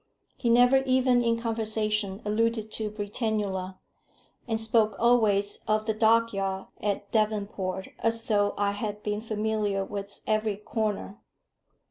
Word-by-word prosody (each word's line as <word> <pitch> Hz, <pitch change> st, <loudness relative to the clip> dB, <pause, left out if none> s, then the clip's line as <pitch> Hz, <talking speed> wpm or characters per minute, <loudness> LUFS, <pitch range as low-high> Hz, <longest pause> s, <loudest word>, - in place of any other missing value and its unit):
He 240 Hz, -, -1 dB
never 245 Hz, +3 st, +6 dB
even 255 Hz, -1 st, +3 dB
in 230 Hz, 0 st, +1 dB
conversation 215 Hz, -3 st, -1 dB
alluded 220 Hz, +1 st, 0 dB
to 215 Hz, -1 st, -2 dB
Britannula, 205 Hz, -3 st, -3 dB, 0.7 s
and 225 Hz, -2 st, 0 dB
spoke 220 Hz, -2 st, +2 dB
always 215 Hz, -4 st, +3 dB
of 215 Hz, 0 st, +1 dB
the 220 Hz, -, 0 dB
dockyard 215 Hz, -4 st, +2 dB, 0.2 s
at 205 Hz, -1 st, -2 dB
Devonport 200 Hz, -3 st, -1 dB
as 225 Hz, 0 st, 0 dB
though 205 Hz, -3 st, +1 dB
I 200 Hz, 0 st, +1 dB
had 210 Hz, 0 st, -4 dB
been 210 Hz, 0 st, -2 dB
familiar 215 Hz, -2 st, -1 dB
with 200 Hz, 0 st, -5 dB
its 200 Hz, -, -6 dB
every 215 Hz, -1 st, 0 dB
corner. 210 Hz, -1 st, -3 dB
215 Hz, 130 wpm, -27 LUFS, 205-225 Hz, 0.7 s, never